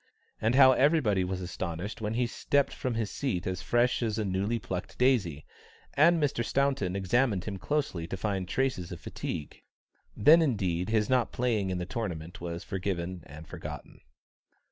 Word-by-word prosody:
And 115 +3 +2
how 130 -1 +8
everybody 130 - +3
was 95 0 -3
astonished 90 +3 -5
when 105 +1 -2
he 125 +1 +2
stepped 140 +4 0
from 125 -2 -3
his 110 -3 -2
seat 115 -11 -2
as 95 -1 -3
fresh 120 +1 +2
as 110 -2 -1
a 110 - -1
newly 100 +4 0
plucked 90 -2 -5
daisy, 105 - +2 0.5
and 165 +3 +5
Mr. 140 -5 0
Staunton 135 -8 0
examined 100 0 +1
him 100 -3 -5
closely 140 - -2
to 95 - -4
find 95 -2 -2
traces 100 -6 -1
of 85 - -6
fatigue. 75 - -6 0.6
Then 155 +11 +7
indeed 95 - 0
his 110 -2 +2
not 130 -2 +2
playing 115 -6 0
in 90 - -1
the 90 - -3
tournament 90 -7 -5
was 85 0 -5
forgiven 90 -2 -3
and 75 +3 -11
forgotten. - - -8
105 Hz, 165 wpm, -29 LUFS, 90-125 Hz, 0.6 s, how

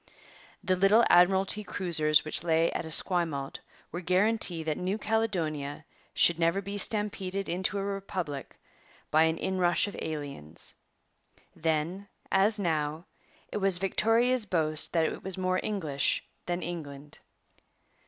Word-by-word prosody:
The 185 - +1
little 195 +5 +4
Admiralty 190 +4 +3
cruisers 160 -6 +1
which 155 - -1
lay 165 0 +2
at - - -4
Esquimalt 160 -4 +2 0.3
were 175 - -5
guarantee 185 -2 +2
that 155 -1 -2
New 185 +3 -2
Caledonia 165 -11 -2 0.3
should 170 -1 +4
never 170 +3 +2
be 200 +1 -6
stampeded 195 -2 -2
into 185 +3 -1
a 195 - -2
republic 185 -8 -5 0.5
by 155 +1 +5
an 160 0 0
inrush 180 -2 +1
of 205 - -7
aliens. 145 - -6 0.8
Then, 165 +5 -2 0.2
as 200 +3 +3
now, 160 -3 -2 0.5
it - - -3
was 195 -3 +1
Victoria's 225 +5 +1
boast 155 -4 +4
that 165 -2 +2
it - - -4
was 190 -1 +2
more 185 0 0
English 160 -10 -1 0.2
than 175 0 -2
England. 150 -4 -7
175 Hz, 130 wpm, -28 LUFS, 155-195 Hz, 0.8 s, by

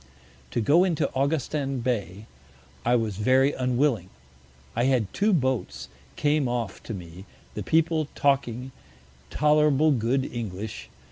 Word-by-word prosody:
To - - -2
go 150 - +5
into 175 -5 0
Augustin 140 -1 -1
Bay 105 -5 -3 0.6
I 120 +1 +3
was 110 -5 -1
very 130 +6 +3
unwilling: 125 - 0 0.7
I 120 +2 +1
had 125 -7 +1
two 210 +2 +2
Boats 125 - -1 0.3
came 145 -2 +1
off 120 -5 -3
to 115 - -4
me, 90 +1 -10 0.3
the - - -5
People 160 -1 +1
talking 130 -2 0 0.6
tolerable 150 0 +3
good 130 +1 +1
English. 110 -4 -6
130 Hz, 125 wpm, -26 LUFS, 110-145 Hz, 0.7 s, go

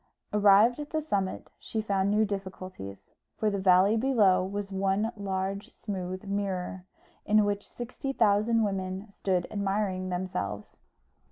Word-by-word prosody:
Arrived 210 +4 +6
at 295 0 -5
the 315 - 0
summit 200 -11 -2
she 220 - -4
found 200 -2 +1
new 210 +1 +3
difficulties; 185 - -7 0.3
for 215 -1 +1
the 200 - -1
valley 190 +2 +5
below 215 -7 +4
was 200 +1 -4
one 195 +3 +1
large 195 0 -3
smooth 185 -3 -5
mirror, 190 -2 -3 0.4
in 210 0 +4
which 205 0 -2
sixty 250 +3 -5
thousand 225 -1 +3
women 190 -1 -2
stood 185 -3 0
admiring 195 -2 -1
themselves. 175 - -4
200 Hz, 135 wpm, -29 LUFS, 185-210 Hz, 0.4 s, Arrived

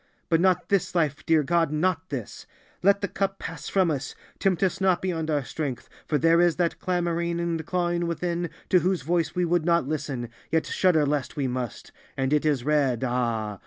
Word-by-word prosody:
But 165 -1 +3
not 180 -2 +2
this 195 -2 +1
life, 155 -3 0
dear 160 -2 +4
God, 165 +1 +1
not 165 +3 0
this. 125 -7 -6 0.3
Let 200 +1 +4
the 200 - 0
cup 195 0 -2
pass 150 -4 -7
from 185 -4 +2
us, 135 -2 -4 0.2
tempt 190 -2 +1
us 190 0 0
not 185 -2 +3
beyond 165 -4 -2
our 145 -2 +1
strength, 140 -6 -4 0.2
for 150 - +2
there 165 +2 +4
is 175 -2 +3
that 175 -2 0
clamoring 170 -2 -1
and 170 -2 -1
clawing 175 0 -1
within, 170 0 -2 0.2
to 185 - +5
whose 180 -3 0
voice 165 0 0
we 180 0 +1
would 170 -1 +1
not 170 -4 +2
listen, 140 -6 -3 0.2
yet 160 0 +1
shudder 170 -5 +2
lest 145 -1 -1
we 140 - -1
must, 125 -2 -5 0.3
and 135 +1 0
it 150 +1 +2
is 140 -5 +1
red, 140 -4 +1
Ah! 115 -5 -1
165 Hz, 200 wpm, -26 LUFS, 145-175 Hz, 0.3 s, to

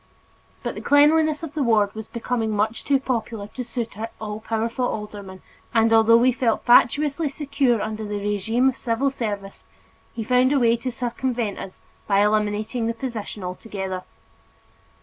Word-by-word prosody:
But - - -2
the - - -7
cleanliness 305 +2 +4
of 315 -2 -6
the 310 - -2
ward 215 -5 +3
was 220 0 -7
becoming 235 -1 -2
much 215 +2 -1
too 275 -1 +2
popular 230 -5 -3
to 250 - -6
suit 230 -3 -5
our 225 +1 -3
all 210 -1 -5
powerful 230 +3 -2
alderman 205 -4 -7 0.3
and, 225 0 +4
although 225 +1 +6
we 250 +2 +4
felt 235 -3 0
fatuously 290 +5 +4
secure 275 -4 0
under 215 +1 -4
the 210 -1 -3
regime 210 +5 +1
of 260 - -4
civil 250 +4 0
service, 205 -6 -5 0.5
he 225 - -3
found 250 +3 +3
a 280 - +3
way 235 -2 +4
to 250 +2 -4
circumvent 240 -3 -2
us 190 - -9 0.3
by 200 -1 +3
eliminating 215 +2 0
the 230 - -2
position 225 -5 -5
altogether. 190 0 -5
230 Hz, 165 wpm, -23 LUFS, 210-255 Hz, 0.5 s, although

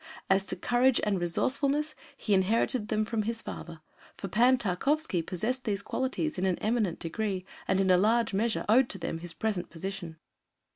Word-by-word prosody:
As 190 0 +3
to - - -2
courage 245 +1 +3
and 200 -3 +1
resourcefulness, 280 - 0 0.2
he 210 - 0
inherited 210 +4 +2
them 215 0 0
from 225 0 -1
his 225 +2 -2
father, 165 -2 -8 0.4
for 195 - -5
Pan 245 +7 +4
Tarkowski 235 - 0
possessed 220 +10 -2
these 200 -3 -2
qualities 260 - -2
in 190 - 0
an 185 - +1
eminent 215 -5 0
degree 185 +2 -3 0.2
and 190 - +2
in 190 -1 +3
a 180 - +6
large 225 +3 +2
measure 220 +3 0
owed 240 +4 +5
to 195 - 0
them 165 -2 -4
his 170 0 -6
present 200 -3 -2
position. 175 -1 -6
210 Hz, 180 wpm, -29 LUFS, 185-240 Hz, 0.4 s, a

